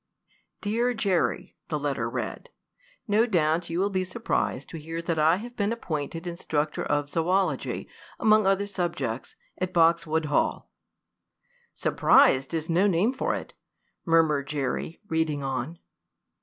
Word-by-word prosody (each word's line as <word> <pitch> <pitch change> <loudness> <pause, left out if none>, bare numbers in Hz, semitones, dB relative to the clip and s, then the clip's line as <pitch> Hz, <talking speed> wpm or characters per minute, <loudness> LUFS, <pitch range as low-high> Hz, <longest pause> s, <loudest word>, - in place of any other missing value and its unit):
"Dear 235 +4 0
Jerry," 195 -5 0
the - - -1
letter - - -2
read, - - -5 0.6
"no 220 +3 +3
doubt 170 -4 +1
you 165 - -2
will 200 +2 +1
be 185 -1 0
surprised 185 - -2
to 165 - -7
hear 165 +2 -5
that 165 -1 -1
I 160 +2 +5
have 240 +5 -8
been 205 +1 0
appointed 165 -6 -4
instructor 155 -3 -2
of 145 -1 0
zoology, 165 0 0 0.3
among 215 -2 +4
other 195 +1 +2
subjects, 170 - -3 0.2
at 185 0 -2
Boxwood 165 -2 +3
Hall." 145 - 0 1.0
"Surprised 135 0 +4
is 160 -1 -2
no 175 +4 +3
name 200 +6 +2
for 260 - -1
it!" - - -7 0.5
murmured 160 -5 +3
Jerry, 145 +2 -3
reading 160 -3 0
on. 135 +5 -3
165 Hz, 135 wpm, -27 LUFS, 155-195 Hz, 1.0 s, I